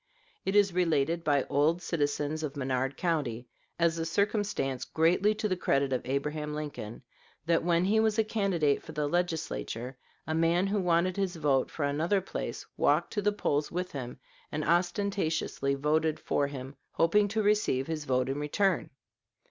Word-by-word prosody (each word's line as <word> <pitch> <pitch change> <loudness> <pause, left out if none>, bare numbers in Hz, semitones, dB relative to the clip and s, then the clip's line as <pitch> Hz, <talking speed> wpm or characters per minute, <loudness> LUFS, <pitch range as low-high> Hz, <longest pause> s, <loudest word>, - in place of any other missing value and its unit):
It 190 - 0
is 200 -3 +4
related 165 -2 +1
by 145 -3 +2
old 150 +5 +2
citizens 150 -2 -1
of 150 -2 -4
Menard 130 0 -1
County, 140 -9 -1 0.3
as 170 -1 +2
a - - 0
circumstance 200 - 0
greatly 180 +6 +2
to 215 - -1
the 185 - 0
credit 140 -6 +1
of 130 - 0
Abraham 150 +3 -2
Lincoln, 145 -7 -6 0.4
that 165 -1 +2
when 170 +1 +2
he 215 +3 +3
was 220 0 +2
a 220 - +4
candidate 195 -9 +1
for 160 - -10
the 150 -1 -1
Legislature 160 -7 -2 0.3
a 155 - -2
man 165 +3 +2
who 200 +1 0
wanted 180 0 +2
his 190 -2 -1
vote 145 -5 +1
for 155 - -4
another 160 +8 +1
place 190 - -5
walked - - +2
to 205 - 0
the 210 +1 +2
polls 150 -7 -1
with 180 +1 -3
him 125 -3 -6 0.3
and 150 0 -2
ostentatiously 175 -5 0
voted 155 +2 +1
for 140 - 0
him, 135 -1 -8 0.2
hoping 205 +5 +3
to 215 +2 -1
receive 205 -11 +2
his 155 -1 -4
vote 130 -1 +1
in 135 +2 -2
return. 165 +3 +1
160 Hz, 170 wpm, -29 LUFS, 145-185 Hz, 0.4 s, is